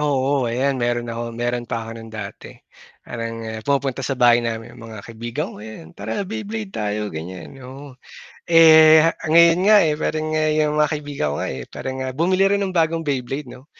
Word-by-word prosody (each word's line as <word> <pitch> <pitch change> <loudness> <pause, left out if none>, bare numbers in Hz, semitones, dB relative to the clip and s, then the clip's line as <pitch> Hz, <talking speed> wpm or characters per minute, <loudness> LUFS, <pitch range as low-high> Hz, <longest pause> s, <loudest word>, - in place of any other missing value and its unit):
Oo, 135 -3 0
ayan, 130 +2 -1
meron 120 0 -1
ako 115 0 -6
meron 120 0 -3
pa 115 -2 -3
ako 115 0 -8
no'n 115 - -11
dati. 110 -3 -9 0.5
Parang, 115 -1 -6
ah, 110 0 -6
pumupunta 135 +1 -1
sa 135 0 -3
bahay 120 -1 +5
namin 115 -1 -5
'yung 120 - -14
mga 110 -2 -10
kaibigan 120 +6 -5
ko, - - -12
ayan, 105 -7 -11
"tara 110 - -4
Beyblade 215 0 -6
tayo," 105 -1 -3
ganyan, 90 - -8
oo. 135 +2 -11 0.5
Eh, 160 -1 +7
ah, 165 +1 +1
ngayon 170 +2 +5
nga, 215 +1 +7
eh, 155 -2 +1
parang 155 0 -2
nga 155 0 0
'yung 150 -1 +1
mga 150 0 +3
kaibigan 145 - -3
ko - - -4
nga, - - -2
eh, 65 - -6
parang 130 0 -6
nga - - -4
bumili 185 +7 +2
rin 200 - 0
ng 195 - -1
bagong 165 0 +1
Beyblade 135 -1 -3
'no. 130 +3 -13
130 Hz, 200 wpm, -21 LUFS, 115-155 Hz, 0.5 s, Eh